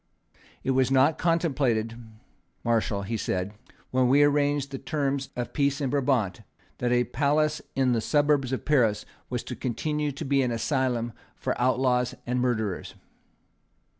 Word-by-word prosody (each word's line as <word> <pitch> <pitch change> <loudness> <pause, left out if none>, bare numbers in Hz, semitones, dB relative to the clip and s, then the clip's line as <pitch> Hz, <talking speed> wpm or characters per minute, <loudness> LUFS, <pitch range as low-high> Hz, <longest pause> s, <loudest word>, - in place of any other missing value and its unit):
"It 135 - +1
was 130 -1 +3
not 135 +3 +3
contemplated, 135 -10 +1 0.7
Marshal," 110 -3 0
he 110 +3 -2
said, 95 0 -2 0.4
"when 130 0 +3
we 140 +3 +6
arranged 145 -1 +2
the 135 - -5
terms 140 -3 -2
of 120 -1 -4
peace 140 -1 +1
in 135 -3 -1
Brabant, 125 -9 +1 0.4
that 120 0 0
a 125 0 +4
palace 150 +3 +1
in 130 -2 +2
the 115 -2 +1
suburbs 145 -1 +2
of 130 - -3
Paris 115 -9 +2 0.2
was 125 -1 -3
to 125 - -6
continue 150 +5 -2
to 140 - -6
be 135 0 +2
an 125 - +1
asylum 120 -1 -1 0.2
for - - -2
outlaws 125 -1 +2
and 125 +1 0
murderers." 110 -6 -1
130 Hz, 150 wpm, -27 LUFS, 120-145 Hz, 0.7 s, we